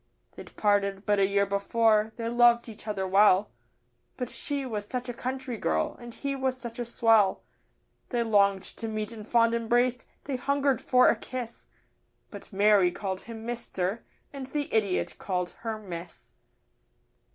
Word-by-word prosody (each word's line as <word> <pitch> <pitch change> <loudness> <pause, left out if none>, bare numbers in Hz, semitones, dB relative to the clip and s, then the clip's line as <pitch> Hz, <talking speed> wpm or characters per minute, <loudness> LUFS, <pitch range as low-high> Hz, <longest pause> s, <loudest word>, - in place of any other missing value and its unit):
They'd - - -12
parted 200 -1 +1
but 205 -1 +2
a 195 - +4
year 200 0 +2
before, 215 +2 +2
they 230 -1 -4
loved 240 0 +4
each 220 -1 -10
other 195 -3 -2
well 200 +1 +4 0.7
But 250 -2 -4
she 285 -2 -2
was 210 -4 -4
such 250 +2 -4
a 245 - -4
country 255 0 -4
girl 80 0 0
and 240 -1 -9
he 275 +3 -4
was 260 -1 -1
such 235 -1 -7
a 240 - -2
swell; 225 -4 +3 0.7
They 240 -2 0
longed 200 -3 +3
to 225 - -7
meet 215 0 -3
in 220 -2 -8
fond 230 +1 +3
embrace, 240 +2 +1 0.2
they 275 -2 -3
hungered 280 -1 +1
for 250 -1 +4
a - - +3
kiss 245 -2 -7 0.6
But - - -11
Mary 200 -2 +4
called 190 0 -4
him 225 -1 -8
'Mister' 230 -3 -3 0.3
and 270 -2 -6
the 290 +1 -4
idiot 205 -4 0
called 180 -2 -2
her 225 -1 -4
'Miss. 175 - -9
225 Hz, 165 wpm, -28 LUFS, 200-245 Hz, 0.7 s, a